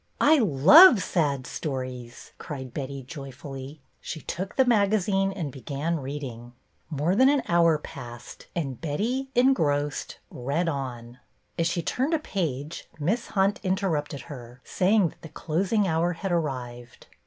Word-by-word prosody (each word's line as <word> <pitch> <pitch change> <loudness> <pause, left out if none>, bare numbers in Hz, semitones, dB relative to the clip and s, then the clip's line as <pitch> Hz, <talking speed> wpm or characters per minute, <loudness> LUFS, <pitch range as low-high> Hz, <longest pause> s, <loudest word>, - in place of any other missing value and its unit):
I 305 +1 +5
love 210 - +8
sad 140 -7 0
stories," 130 -4 -6
cried 130 -4 -7
Betty, 135 -1 -5
joyfully. 135 0 -9 0.2
She 160 - -6
took 190 +5 -5
the 265 - +4
magazine 200 -4 +2
and 170 -8 -4
began 145 +5 -3
reading. 130 -4 -7 0.4
More 155 +4 0
than 260 +5 +6
an 285 -2 +2
hour 170 -2 +4
passed, 120 -5 -10
and 140 -7 -3
Betty, 230 - -2
en 255 +2 +5
grossed, 145 - -1 0.2
read 140 +8 -2
on. 125 -5 -5 0.4
As 165 - +2
she 170 0 -1
turned 275 - 0
a - - 0
page 155 - -4
Miss 205 +11 -1
Hunt 195 +1 +3
interrupted 180 -7 -1
her, 125 -5 -10
saying 195 -1 +2
that - - -20
the 160 - -10
closing 190 +7 0
hour 170 +1 +1
had 190 +3 -4
arrived. 125 -7 -4
155 Hz, 145 wpm, -26 LUFS, 135-195 Hz, 0.4 s, love